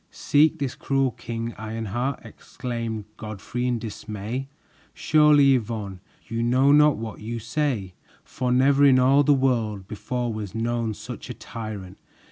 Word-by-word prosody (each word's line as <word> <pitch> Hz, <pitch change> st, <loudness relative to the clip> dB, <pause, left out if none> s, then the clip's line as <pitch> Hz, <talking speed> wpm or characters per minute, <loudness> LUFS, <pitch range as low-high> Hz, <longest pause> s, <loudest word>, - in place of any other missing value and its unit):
"Seek 155 Hz, +2 st, +2 dB
this 140 Hz, -4 st, -2 dB
cruel 135 Hz, -2 st, 0 dB
King 115 Hz, 0 st, -5 dB
Ironheart!" 115 Hz, +4 st, -3 dB
exclaimed 115 Hz, -1 st, -5 dB
Godfrey 110 Hz, +3 st, -4 dB
in 125 Hz, -1 st, +1 dB
dismay. 110 Hz, +3 st, -5 dB, 0.5 s
"Surely, 150 Hz, -3 st, +5 dB
Yvonne, 105 Hz, -6 st, -3 dB, 0.3 s
you 115 Hz, 0 st, -2 dB
know 130 Hz, +4 st, +4 dB
not 150 Hz, 0 st, +5 dB
what 110 Hz, -1 st, -6 dB
you 115 Hz, +2 st, -5 dB
say, 115 Hz, -5 st, -2 dB, 0.3 s
for 125 Hz, -1 st, -3 dB
never 135 Hz, +3 st, +4 dB
in 135 Hz, -2 st, +7 dB
all 135 Hz, +3 st, +5 dB
the 145 Hz, -, +3 dB
world 115 Hz, -7 st, 0 dB
before 120 Hz, +3 st, -3 dB
was 105 Hz, -1 st, -6 dB
known 115 Hz, -1 st, -1 dB
such -, -, -8 dB
a -, -, -5 dB
tyrant! 105 Hz, -5 st, -8 dB
120 Hz, 140 wpm, -24 LUFS, 110-135 Hz, 0.5 s, in